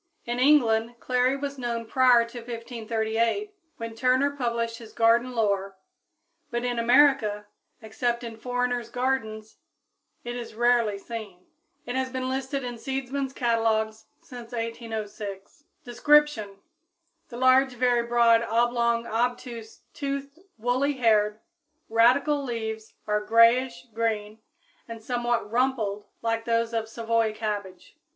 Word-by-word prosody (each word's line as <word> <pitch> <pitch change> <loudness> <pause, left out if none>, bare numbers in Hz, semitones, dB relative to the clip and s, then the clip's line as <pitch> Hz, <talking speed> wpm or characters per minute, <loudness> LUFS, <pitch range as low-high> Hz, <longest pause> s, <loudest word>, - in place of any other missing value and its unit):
In 240 +1 -2
England 240 -5 +3
clary 255 +1 +1
was 280 -1 -5
known 235 -2 -3
prior 245 0 +4
to 240 +1 -8
1538, 230 - -2 0.2
when 230 0 -6
Turner 255 +4 +2
published 235 -3 -2
his 225 -2 -12
garden 235 +2 +3
lore, 200 -3 0 0.7
but 240 +1 -2
in 245 -1 -1
America, 235 -4 +4 0.4
except 235 +2 -2
in 230 -1 -6
foreigners' 245 0 -2
gardens, 225 -4 -2 0.7
it 240 0 -5
is 235 -3 -7
rarely 235 -3 +2
seen. 200 -4 -8 0.4
It 245 - -4
has 260 0 -1
been 260 0 -3
listed 265 +1 -3
in 245 -2 -6
seedsmen's 270 +1 -3
catalogs 220 -3 0
since 245 -2 -11
1806. 220 -1 -6 0.2
Description. 245 -5 +3 0.7
The 240 - -8
large, 260 +1 +4
very 245 -1 +2
broad, 235 -1 +4
oblong, 235 0 +1
obtuse, 235 -1 -3
toothed, 280 +1 -5 0.2
woolly 250 +5 +1
haired, 215 -4 +2 0.5
radical 260 +6 +3
leaves 220 -3 -5
are 210 0 0
grayish 230 +4 +4
green 220 -1 -2 0.5
and 230 -1 -9
somewhat 240 -3 -1
rumpled 230 -5 0 0.2
like 225 0 -1
those 230 0 0
of 225 -1 -2
Savoy 225 -1 0
cabbage. 210 - -5
235 Hz, 120 wpm, -26 LUFS, 225-250 Hz, 0.7 s, prior